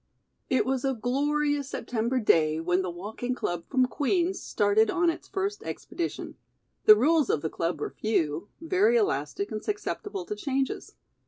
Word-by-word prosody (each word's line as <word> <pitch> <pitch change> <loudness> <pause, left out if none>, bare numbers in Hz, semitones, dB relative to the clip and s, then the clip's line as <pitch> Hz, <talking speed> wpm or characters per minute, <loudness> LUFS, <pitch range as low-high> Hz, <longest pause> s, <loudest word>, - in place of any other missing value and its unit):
It 260 - +2
was 260 -1 -1
a 270 -1 +1
glorious 285 +4 0
September 240 +1 -1
day 160 -7 +3
when 180 +3 +1
the 185 - -3
walking 215 +8 -4
club 175 -7 -3
from 260 -2 +3
Queen's 340 - 0
started 210 +2 +2
on 345 -1 +2
its - - -10
first 395 +2 -2
expedition. 340 -2 -5 0.5
The 430 - +10
rules 310 -1 +3
of 145 - +1
the 160 - -2
club 170 +1 -2
were - - -3
few, 165 -5 -1
very 385 +8 +3
elastic 405 -2 -1
and 215 - -4
susceptible 410 -2 -4
to 420 - -4
changes. 270 -6 -2
265 Hz, 160 wpm, -27 LUFS, 210-340 Hz, 0.5 s, The